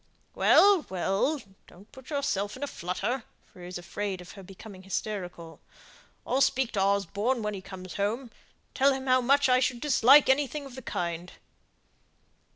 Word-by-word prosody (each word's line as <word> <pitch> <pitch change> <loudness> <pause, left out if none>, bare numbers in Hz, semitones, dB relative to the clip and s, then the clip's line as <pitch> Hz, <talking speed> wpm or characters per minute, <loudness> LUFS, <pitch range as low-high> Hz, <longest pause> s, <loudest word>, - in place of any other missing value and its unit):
"Well, 400 -5 +5
well, 195 - 0 0.3
don't 195 +4 -18
put 265 -1 -14
yourself 235 -8 -2
in 275 - -6
a - - -1
flutter," 220 +6 -3 0.2
for - - -20
he 175 - -9
was 180 - -6
afraid 190 +2 -4
of 180 0 -11
her 195 - -11
becoming 195 +1 -12
hysterical; 185 -4 -5 0.7
"I'll 265 - 0
speak 265 -2 +2
to 200 - -1
Osborne 200 +5 0
when 210 0 -2
he 195 - -6
comes 185 -1 -9
home, 205 +5 -1
and 245 -4 -14 0.4
tell 275 +1 +3
him 265 0 -5
how 255 -1 +3
much 275 +3 +3
I 255 0 +4
should 255 -1 0
dislike 280 0 +6
anything 280 +2 +1
of 270 - -11
the 260 - -9
kind." 175 -4 -4
215 Hz, 170 wpm, -28 LUFS, 190-265 Hz, 0.7 s, dislike